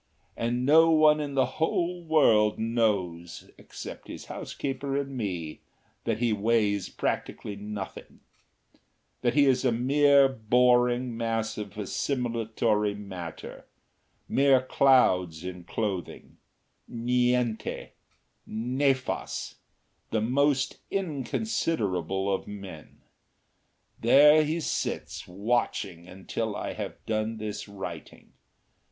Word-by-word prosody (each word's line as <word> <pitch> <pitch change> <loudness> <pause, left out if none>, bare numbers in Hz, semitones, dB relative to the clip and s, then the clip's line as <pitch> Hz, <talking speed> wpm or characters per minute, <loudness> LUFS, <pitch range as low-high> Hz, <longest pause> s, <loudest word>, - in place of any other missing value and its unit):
And 120 +2 -1
no 160 +3 +6
one 155 -1 +5
in 145 -2 -4
the 130 -1 +4 0.2
whole 175 +2 0
world 115 -10 +4
knows 100 -7 -1
except - - -9
his - - -8
housekeeper 135 0 -4
and 140 -1 -3
me 90 -9 -4 0.4
that 115 - 0
he 115 -1 +1
weighs 105 -2 +1
practically 105 - -3
nothing; 100 -1 -8 1.0
that 120 0 +1
he 145 -1 +5
is 130 -1 +3
a 130 - +3
mere 140 +3 +5
boring 125 0 +2
mass 115 -1 -2
of 105 -1 -7
assimilatory 115 -2 -1
matter, 90 -5 -8 0.6
mere 135 -1 +4
clouds 90 -12 +3
in 90 -1 -7
clothing, 95 -4 -4 0.5
niente, 125 -1 0 0.6
nefas, 130 +4 -1 0.6
the 110 - 0
most 135 +4 +1
inconsiderable 115 - -1
of 95 - -3
men. 100 -6 -10 1.0
There 150 +6 +7
he 160 +3 -1
sits - - -3
watching 95 -3 -2
until 105 +4 -4
I - - -4
have - - -7
done 110 0 -1
this 105 -1 -5
writing. 95 -5 -9
115 Hz, 100 wpm, -27 LUFS, 100-135 Hz, 1.0 s, There